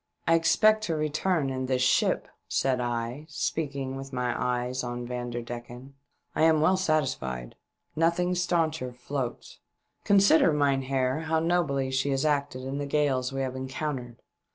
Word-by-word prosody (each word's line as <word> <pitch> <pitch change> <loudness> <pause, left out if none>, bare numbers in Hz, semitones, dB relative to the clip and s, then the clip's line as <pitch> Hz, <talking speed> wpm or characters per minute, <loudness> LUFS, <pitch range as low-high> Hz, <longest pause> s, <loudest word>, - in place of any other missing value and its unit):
" - - -43
I 165 - +5
expect 190 +7 +4
to 165 - -1
return 155 0 0
in 130 0 -3
this 130 -1 +1
ship," 130 - +2 0.2
said 130 -2 +1
I, 120 +4 -3
speaking 140 -3 -2
with 135 0 -7
my 125 -2 -1
eyes 125 +1 -1
on 120 0 -4
Vanderdecken. 120 +1 -6 0.4
"I - - 0
am 160 -1 +5
well 160 +5 +4
satisfied. 130 - -1 0.4
Nothing 170 +3 +2
stauncher 165 -7 0
floats. 125 0 -5 0.4
Consider, 195 -4 +5
mynheer, 135 0 +1
how 160 0 +2
nobly 155 -6 +1
she 135 +2 0
has 135 +2 0
acted 140 -3 0
in 135 +2 -4
the 145 - -3
gales 140 -3 +1
we 135 0 -3
have 130 -1 -3
encountered. 130 -2 -5
135 Hz, 150 wpm, -27 LUFS, 125-155 Hz, 0.4 s, I